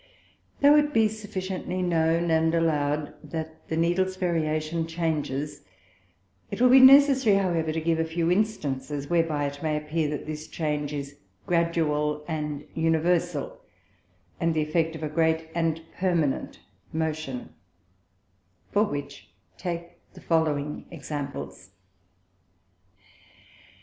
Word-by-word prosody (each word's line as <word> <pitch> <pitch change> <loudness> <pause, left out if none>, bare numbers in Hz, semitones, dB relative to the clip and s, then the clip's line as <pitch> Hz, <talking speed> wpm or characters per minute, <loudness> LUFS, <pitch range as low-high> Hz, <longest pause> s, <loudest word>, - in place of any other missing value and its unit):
Though 290 +1 +7
it 295 0 +2
be 220 -1 +5
sufficiently 190 -3 -4
known 165 -1 +2
and 160 +1 +3
allow'd, 150 -2 0
that 160 +1 -7
the 160 - -2
Needles 180 +3 +1
Variation 165 -2 -1
changes, 150 -4 -2 0.9
it - - -5
will 250 0 +5
be 265 - +9
necessary 265 -4 +7
however 170 -5 +1
to 160 - -1
give 165 0 0
a - - +3
few 165 +1 0
Instances, 145 -8 -1
whereby 165 -4 +1
it 145 0 -5
may 155 -1 0
appear 150 +1 -1
that 150 - -4
this 155 0 -6
Change 150 -2 -2
is 140 -1 -6 0.3
gradual 150 -3 0
and 150 -2 -3
universal, 165 - 0 0.8
and 165 -1 +1
the 155 - +2
effect 160 +1 0
of 160 - -7
a - - 0
great 160 +1 +1
and 165 -1 0 0.2
permanent 170 -7 0 0.3
motion: 155 -5 -3 1.2
For 205 - +4
which 145 -5 -6 0.3
take 170 -2 -5 0.2
the - - -12
following 150 -3 0
Examples. 140 - -6
160 Hz, 120 wpm, -26 LUFS, 150-175 Hz, 1.2 s, be